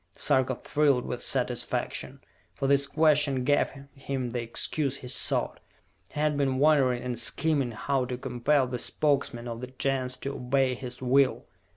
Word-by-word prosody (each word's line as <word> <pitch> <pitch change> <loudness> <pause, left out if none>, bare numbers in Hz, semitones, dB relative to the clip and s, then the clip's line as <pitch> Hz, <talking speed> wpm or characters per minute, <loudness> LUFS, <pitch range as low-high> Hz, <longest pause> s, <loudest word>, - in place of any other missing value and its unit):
Sarka 130 -1 +1
thrilled 140 -2 +1
with - - -4
satisfaction, - - -2 0.3
for - - -3
this 140 0 +3
question 150 -4 +2
gave 145 +2 +2 0.3
him 130 -3 -3
the 120 0 -2
excuse 135 +4 -1
he 125 - -10
sought. 125 - 0 0.5
He - - -7
had 150 0 +1
been 135 -2 0
wondering 135 -4 +3
and 125 -2 -3
scheming 145 +1 +2
how 130 +3 -1
to 125 0 -4
compel 130 +2 +1
the 125 -1 -4
Spokesmen 135 -5 0
of 115 0 -6
the 125 - -5
Gens 130 0 -2
to 140 - -4
obey 130 0 0
his 125 0 -8
will. 130 +1 +2
130 Hz, 160 wpm, -27 LUFS, 125-140 Hz, 0.5 s, this